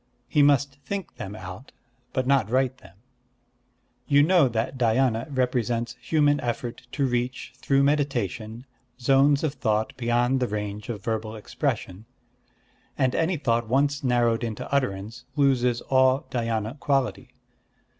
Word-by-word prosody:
He 150 - +2
must 140 -1 +3
think 200 +2 -5
them 100 0 -6
out, 95 +6 -9 0.4
but 130 - -1
not 130 -5 +2
write 130 0 +1
them. 95 -2 -17 1.1
You 145 0 +5
know 170 -3 +5
that 115 +3 -2
Dhyâna 120 0 +1
represents 125 -3 -1
human 145 -2 +2
effort 120 +1 -4
to 140 - +1
reach, 125 0 -2
through 135 +2 +2
meditation, 120 - -1 0.3
zones 140 +3 +4
of 155 -3 0
thought 110 -5 -1
beyond 120 +1 +1
the 125 - 0
range 105 0 -5
of 105 -4 -5
verbal 110 -1 -3
expression; 105 -1 -3 0.9
and 130 -1 +2
any 165 +2 +1
thought 115 -5 0
once 140 +3 +1
narrowed 120 -2 +2
into 110 -3 -4
utterance 115 -2 -2
loses 125 -4 +2
all 130 0 +3
Dhyâna 115 +1 -2
quality.... 130 -2 -1
125 Hz, 135 wpm, -25 LUFS, 115-140 Hz, 1.1 s, You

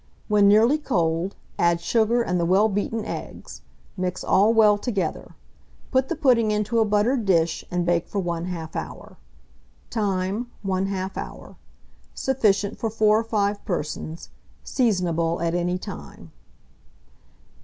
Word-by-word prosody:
When 210 -1 +4
nearly 225 +9 +5
cold, 175 - -1 0.2
add 170 0 +3
sugar 230 +6 +2
and 180 -5 -1
the 170 - +1
well 195 +4 +4
beaten 210 +2 -2
eggs; - - -7 0.3
mix 185 -1 -3
all 205 +4 +4
well 215 -2 +5
together; 200 -8 -3 0.6
put 260 0 +2
the 340 - -1
pudding 250 -7 +3
into 210 +2 0
a 220 - +4
buttered 215 +4 +1
dish, 170 -4 +1
and 175 -1 -1
bake 170 -1 +1
for 205 - -3
1/2 170 -2 -4
hour. - - -7 0.7
Time. 205 +1 -1 0.2
1/2 190 0 -2
hour. - - -8 0.6
Sufficient 210 -6 +1
for 225 - -1
4 215 0 +3
or - - -2
5 205 -2 -1
persons. 160 -2 -4 0.3
Seasonable 175 - 0
at 170 0 -1
any 175 +1 0
time. 75 - -10
200 Hz, 135 wpm, -24 LUFS, 175-220 Hz, 0.7 s, nearly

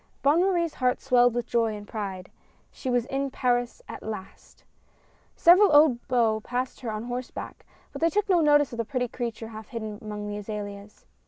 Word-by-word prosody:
Bonne 295 +5 +4
Marie's 345 -4 +1
heart 250 -1 0
swelled 245 -2 +3
with 240 - -1
joy 225 -2 0
and 205 0 -9
pride; 195 -4 -5 0.4
she 260 - -6
was 245 -2 +1
in 275 +1 -2
Paris 245 - -1
at - - -8
last! 210 -3 -9 0.7
Several 365 +3 +6
old 290 -5 +5
beaux 230 -4 +2
passed 250 +3 -4
her 235 -3 -4
on 215 +1 -4
horseback, 245 +1 -6 0.2
but - - -8
they 330 - +4
took 415 +4 0
no 360 -4 +4
notice 290 -3 +4
of - - -6
the 230 - 0
pretty 250 +1 -2
creature 230 -2 -5
half 220 -1 -9
hidden 220 -3 -6
among 210 -1 -6
the 205 0 -4
azaleas. 205 -1 -7
245 Hz, 185 wpm, -26 LUFS, 215-275 Hz, 0.7 s, Several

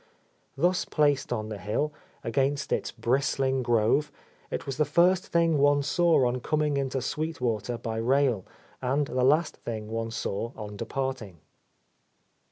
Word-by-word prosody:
Thus 175 +5 +2
placed 145 -4 +1
on 110 -3 -2
the 105 -2 -5
hill, 125 +10 -1 0.3
against 135 +5 0
its - - -1
bristling 130 +3 0
grove, 120 +4 +2 0.4
it - - -4
was 135 - -4
the 155 - +4
first 180 +4 +3
thing 165 -3 +2
one 145 0 +4
saw 165 -1 +3
on 125 +1 0
coming 150 +2 0
into 135 -2 -1
Sweet 160 +3 -3
Water 120 0 -1
by 115 -1 -4
rail, 125 -3 +2 0.4
and 135 +3 +1
the 130 -1 -1
last 150 +6 +3
thing 110 -2 -6
one 115 0 -2
saw 115 +1 -3
on 105 -1 -7
departing. 130 -5 -4
135 Hz, 150 wpm, -27 LUFS, 115-145 Hz, 0.4 s, the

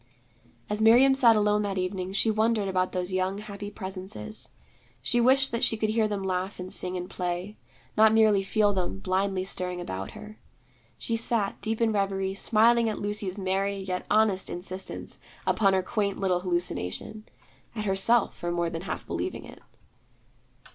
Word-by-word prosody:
As 210 +1 -2
Miriam 245 +5 +6
sat 245 -4 +6
alone 210 0 +2
that 200 -2 -2
evening, 185 0 -2
she 210 +3 +2
wondered 215 -1 +1
about 185 -1 0
those 180 0 -3
young 185 +1 -1
happy 205 -1 -7
presences. 195 +2 -7 0.5
She 240 - +1
wished 265 +3 +4
that 230 - -1
she 225 - +3
could 215 0 0
hear 220 -1 +2
them 205 -2 -3
laugh 185 +1 -2
and 180 0 -5
sing 185 0 0
and 180 0 -5
play; 180 +3 -4 0.4
not 220 0 +6
merely 215 -3 +4
feel 205 +1 +2
them 180 - -2
blindly 185 - -1
stirring 180 -1 0
about 95 - -5
her. 215 0 -11 0.6
She 230 - -2
sat, 225 -3 0
deep 220 0 -2
in 230 -1 +2
reverie, 195 -2 -1
smiling 225 +3 +3
at 215 - -3
Lucy's 205 -2 -3
merry 195 +1 -1
yet 185 -1 -4
honest 210 -3 +2
insistence 185 +2 -6 0.3
upon 195 -3 +3
her 190 -1 +2
quaint 200 0 -1
little 185 -2 +1
hallucination, 180 - -3 0.5
at 215 -2 -3
herself 200 +4 +2
for 175 - -4
more 170 -1 -1
than 165 - -4
half 190 - -5
believing - - -4
it. - - -13
200 Hz, 170 wpm, -27 LUFS, 185-215 Hz, 0.6 s, Miriam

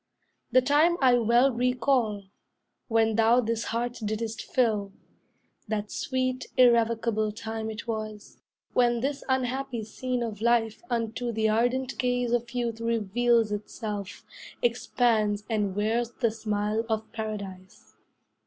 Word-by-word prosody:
The 255 +1 +5
time 305 +6 +4
I 260 -2 +5
well 240 +3 +4
recall, 245 -3 +1 0.6
when 225 -1 +2
thou 230 +2 +5
this 230 -1 -1
heart 240 +2 -2
didst 220 +1 -3
fill; 215 -6 0 0.7
That 210 -1 -3
sweet, 255 -1 -2
irrevocable 230 -3 +3
time 220 +1 -5
it 220 +3 -7
was, 215 -2 -5 0.3
When 240 -1 +3
this 280 +2 -2
unhappy 260 -2 -1
scene 250 +3 -3
of 215 -3 -5
life 230 -2 +2
unto 235 0 -2
The 220 -1 +1
ardent 245 +4 0
gaze 245 -1 0
of 240 0 0
youth 235 -2 -3
reveals 230 0 +2
itself, 205 -1 -5 0.4
Expands, 225 -3 +1
and 210 -4 -1
wears 225 +3 0
the 230 -3 0
smile 215 0 -1
of 220 0 -2
Paradise. 190 - -7
230 Hz, 125 wpm, -27 LUFS, 215-245 Hz, 0.7 s, The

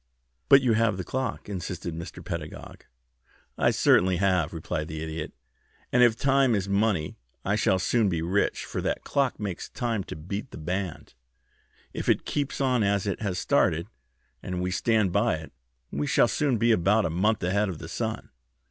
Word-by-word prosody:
"But 135 -1 +8
you 120 -3 +3
have 110 -3 +2
the 95 - -3
clock," 130 +2 -3
insisted 90 -3 -5
Mr. 85 +1 -8
Pedagog. 80 -2 -7 0.7
"I - - +3
certainly 90 0 +4
have," 90 -4 +2
replied 80 -1 -4
the 80 -1 -5
Idiot; 80 -1 -5 0.6
"and 125 - +4
if 120 -2 +6
time 135 -1 +3
is 100 -1 -1
money 100 -5 0 0.3
I 100 - +2
shall 95 -3 +2
soon 105 +3 +2
be 85 -3 -1
rich, 95 +4 0
for - - -4
that - - -2
clock 140 -3 0
makes 100 -5 -4
time 115 -5 -2
to - - -7
beat 100 - -5
the - - -10
band. 90 +1 -4 0.8
If - - -3
it - - +2
keeps 145 -2 -2
on 130 -3 +2
as 100 -1 +1
it 100 -1 -2
has 100 -4 -2
started 85 0 +1 0.5
and 90 -1 -4
we 90 0 -1
stand 105 0 +2
by 100 0 +2
it, 80 0 -9 0.4
we 75 +1 -2
shall - - +4
soon 140 -5 +1
be 115 +2 +3
about 105 +2 +3
a - - -1
month 105 +5 +1
ahead 100 +3 +1
of 90 - -5
the 80 - -8
sun. 110 +6 -4
100 Hz, 185 wpm, -27 LUFS, 85-110 Hz, 0.8 s, But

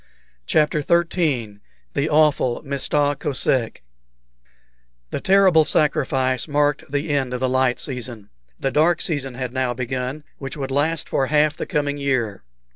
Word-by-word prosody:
CHAPTER 150 0 +2
XIII 150 - 0 0.3
THE 140 +3 0
AWFUL 150 -5 +2
"MISTA 145 +1 0
KOSEK" 130 - 0 1.3
The - - -3
terrible 190 -4 +5
sacrifice 135 -4 +1
marked 145 -1 0
the 145 +2 -1
end 135 -3 0
of - - -3
the 130 - +1
light 130 -1 +1
season. 120 -6 -7 0.3
The 135 - -1
dark 160 +5 +3
season 135 -6 -2
had 125 -1 -4
now 130 -2 -1
begun, 130 +4 -4 0.2
which 135 +1 -6
would 135 -2 -4
last 150 +4 0
for 135 - 0
half 150 0 +2
the - - -5
coming 145 -1 -1
year. 125 -8 -1
140 Hz, 140 wpm, -22 LUFS, 130-150 Hz, 1.3 s, terrible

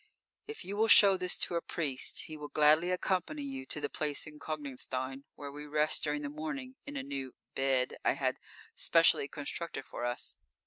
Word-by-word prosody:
_ - - -32 0.4
If 440 0 -7
you 200 +2 -4
will 220 +1 +4
show 200 -3 +9
this 180 -1 0
to - - 0
a 170 - +1
priest, 145 -8 -2
he 155 - -8
will 150 -1 -6
gladly 155 +4 +4
accompany 185 - 0
you 270 -1 -5
to - - -2
the 145 - -1
place 150 -1 -2
in 150 -1 -11
Konigstein, 135 -2 -3
_where 140 -1 -7
we 150 +1 -7
rest 150 +1 +1
during 150 -1 0
the 145 - -3
morning 160 - -5
in 290 -1 -5
a - - -2
new 135 -2 -5 0.2
"bed" 135 -1 +1
I - - +4
had - - -1 0.4
specially 165 -4 +4
constructed 145 -1 -4
for 120 - -6
us. 120 0 -3
150 Hz, 195 wpm, -32 LUFS, 140-180 Hz, 0.4 s, show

